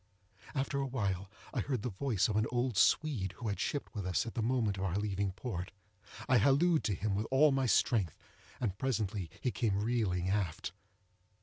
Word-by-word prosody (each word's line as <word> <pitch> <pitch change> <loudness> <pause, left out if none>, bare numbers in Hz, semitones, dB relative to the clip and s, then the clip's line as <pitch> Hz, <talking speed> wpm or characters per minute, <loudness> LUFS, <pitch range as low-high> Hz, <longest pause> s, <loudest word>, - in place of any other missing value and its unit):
After 140 0 0
a 135 - -1
while, 100 -7 -2 0.2
I - - 0
heard 130 -7 -1
the 125 - -2
voice 105 0 +1
of 105 - -2
an 110 +1 +2
old 125 -1 0
Swede, 100 - +2
who 115 +2 -4
had 100 - -3
shipped 145 - -2
with 100 -5 -3
us 90 - +1
at 115 - -6
the 115 - -1
moment 110 -4 +1
of - - -2
our 95 -2 -1
leaving 100 -1 -1
port. 100 -4 -5 0.6
I 130 -4 +5
hallooed 150 - +4
to 105 - +1
him 105 +2 -1
with 105 +3 -1
all 140 +3 +5
my 135 -1 +1
strength, 105 - +2 0.4
and 100 -5 -2
presently 105 -8 -1
he 125 - 0
came 105 -5 0
reeling 105 -6 0
aft. 95 -5 -1
110 Hz, 195 wpm, -33 LUFS, 95-130 Hz, 0.6 s, I